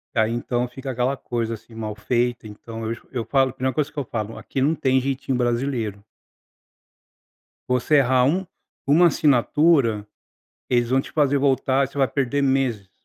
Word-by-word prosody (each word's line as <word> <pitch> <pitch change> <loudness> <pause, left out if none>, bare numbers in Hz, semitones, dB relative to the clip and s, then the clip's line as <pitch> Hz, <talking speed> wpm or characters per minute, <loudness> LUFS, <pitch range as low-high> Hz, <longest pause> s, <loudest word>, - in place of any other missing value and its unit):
Daí, 110 0 +2
então, 120 +1 -1
fica 135 +2 -7
aquela 125 +2 -1
coisa 115 -2 -3
assim, 115 +1 -17
mal 110 -2 -5
feita. 120 +1 -1
Então, 115 +2 -9
eu 110 - -2
esco 115 - -8
eu 120 -4 -3
falo. 135 -1 +2
A - - -9
primeira 130 0 -2
coisa 155 0 -1
que 150 - -28
eu 140 - -2
falo. 110 -1 -4
"Aqui 135 - -4
não 150 +5 +2
tem 130 -3 +2
jeitinho 135 0 -2
brasileiro". 120 -4 -1 1.6
Você 125 +4 +2
errar 130 -2 +4
um 180 +8 +1 0.4
uma 160 +5 +5
assinatura. 140 -5 +3 0.6
Eles 120 -1 +1
vão 130 +1 +3
te - - -11
fazer 145 -2 +2
voltar 135 0 +2
e - - -2
você 135 - -16
vai 135 -1 +3
perder 140 0 -1
meses. 130 -8 0
130 Hz, 180 wpm, -23 LUFS, 115-140 Hz, 1.6 s, uma